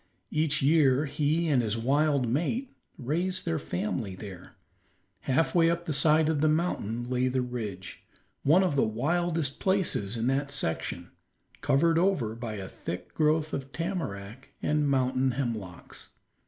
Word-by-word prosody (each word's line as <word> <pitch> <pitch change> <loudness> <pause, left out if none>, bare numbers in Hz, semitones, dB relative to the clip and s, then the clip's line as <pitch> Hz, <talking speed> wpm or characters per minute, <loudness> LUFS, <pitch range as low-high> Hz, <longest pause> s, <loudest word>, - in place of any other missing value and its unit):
Each 155 -2 +1
year 145 -2 +4
he 150 +3 0
and 140 -5 +3
his 110 -1 -1
wild 140 +2 +2
mate 175 - -1 0.2
raised 175 +7 -1
their 165 -2 0
family 100 -2 -3
there. 95 -2 -10 0.6
Half 130 +5 +1
way 165 -1 +5
up 170 0 -1
the 155 - -2
side 155 +2 +4
of 155 -2 +1
the 155 - +4
mountain 150 - -1
lay 125 0 +1
the 130 0 0
ridge, 105 -7 -6 0.4
one 165 +7 +5
of 180 -6 0
the 140 - +3
wildest 155 +6 0
places 175 - 0
in 115 - -1
that 135 +2 0
section, 135 -13 -3 0.5
covered 165 +4 +3
over 170 - +1
by 115 -1 -5
a 95 -2 -6
thick 90 0 -7
growth 155 0 +1
of 135 0 -4
tamarack 135 - -5
and 150 -1 +1
mountain 130 -1 +1
hemlocks. 110 -9 -5
140 Hz, 150 wpm, -28 LUFS, 115-160 Hz, 0.6 s, way